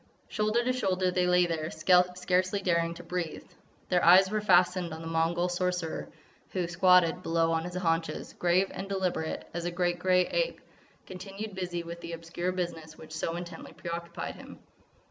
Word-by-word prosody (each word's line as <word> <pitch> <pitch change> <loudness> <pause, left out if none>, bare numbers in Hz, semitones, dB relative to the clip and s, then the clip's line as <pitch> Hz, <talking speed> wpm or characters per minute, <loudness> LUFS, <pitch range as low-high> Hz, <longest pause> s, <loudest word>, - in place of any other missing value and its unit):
Shoulder 215 +2 +1
to 255 +1 +1
shoulder 185 -6 0
they 180 0 +1
lay 180 0 +4
there, 160 -2 -2
scarcely 180 +3 +2
daring 170 -2 +1
to 175 - -10
breathe. 175 -1 -4 0.4
Their 180 -1 +2
eyes 190 +3 +7
were 215 0 0
fastened 180 -3 +3
on 160 - -9
the 165 - -6
Mongol 165 +2 +1
Sorcerer, 180 -2 -2 0.4
who, 180 -2 -1
squatted 180 0 +4
below 165 -2 +1
on 165 0 0
his 180 0 -6
haunches, 165 -2 -1
grave 180 +2 +2
and 195 - -6
deliberate 185 -5 -2
as 170 0 -4
a - - 0
great 175 0 -1
grey 180 0 +3
ape, - - -1 0.5
continued 195 +3 -7
busy 180 -2 -3
with 170 0 -8
the 170 - -6
obscure 165 +2 -3
business 165 -4 -5
which 155 0 -11
so 165 +1 -2
intently 175 0 -8
preoccupied 170 0 -5
him. - - -11
180 Hz, 170 wpm, -29 LUFS, 170-185 Hz, 0.5 s, eyes